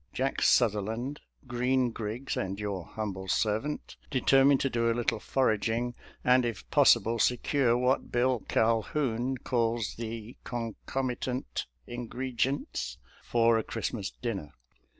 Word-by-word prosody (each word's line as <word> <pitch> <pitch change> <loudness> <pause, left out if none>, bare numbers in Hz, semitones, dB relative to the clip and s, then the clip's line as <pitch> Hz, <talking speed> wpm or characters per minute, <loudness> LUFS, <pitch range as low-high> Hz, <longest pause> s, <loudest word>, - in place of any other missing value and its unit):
Jack 135 +1 -1
Sutherland, 115 +5 +2 0.3
Green 125 0 +1
Griggs, 115 +4 -4
and 95 +1 -3
your 100 -4 -3
humble 95 -3 -5
servant 110 +10 -1
deter 135 0 +4
mined 140 -1 +5
to 135 - +1
do 115 0 +1
a - - 0
little 120 -2 0
foraging, 115 0 0 0.3
and 125 0 +5
if 115 -4 -4
possible 115 +1 +5
se 125 +3 +3
cure 125 -3 +2
what 125 +2 +1
Bill 125 0 +2
Calhoun 120 +2 +1
calls 115 -3 0
the 115 0 -6
" - - -41
concomitant 125 +2 -3 0.2
ingregents 125 +3 -2
" - - -26
for 115 -1 +4
a - - -2
Christmas 105 -4 -3
dinner. 95 -11 -5
120 Hz, 130 wpm, -29 LUFS, 110-130 Hz, 0.3 s, mined